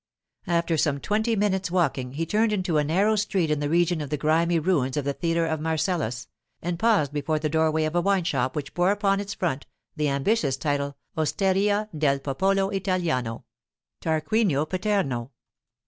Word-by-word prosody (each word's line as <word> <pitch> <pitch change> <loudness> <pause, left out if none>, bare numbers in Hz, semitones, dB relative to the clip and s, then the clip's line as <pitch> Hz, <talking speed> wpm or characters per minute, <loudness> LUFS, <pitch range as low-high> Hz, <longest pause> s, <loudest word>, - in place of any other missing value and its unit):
After 170 -1 +1
some 145 -2 +1
twenty 220 +7 0
minutes' 195 -2 0
walking 150 -8 0
he 165 +4 -2
turned 215 +6 +1
into 185 -6 +1
a - - +2
narrow 195 +9 +2
street 195 -6 0
in 150 - +1
the 145 0 -1
region 170 0 +2
of 145 - -5
the 150 - -1
grimy 165 +3 +2
ruins 155 -5 0
of 145 - -1
the 140 - 0
theatre 165 +1 0
of 160 -1 -1
Marcellus, 155 -6 -1 0.3
and 170 0 -3
paused 200 - +2
before 150 +2 -1
the 155 0 -1
doorway 160 0 +2
of 155 0 -1
a 175 - +3
wine 195 0 +2
shop 130 -6 -1
which 150 -2 -4
bore 175 +1 +2
upon 200 -1 +2
its 200 0 -5
front 155 -6 -2 0.3
the 150 -2 0
ambitious 140 - +1
title, 140 -1 -2 0.2
'Osteria 195 +6 +1
del 145 -2 +2
Popolo 195 +9 0
Italiano—Tarquinio 160 - -2
Paterno. 185 - -1
165 Hz, 170 wpm, -25 LUFS, 145-195 Hz, 0.3 s, a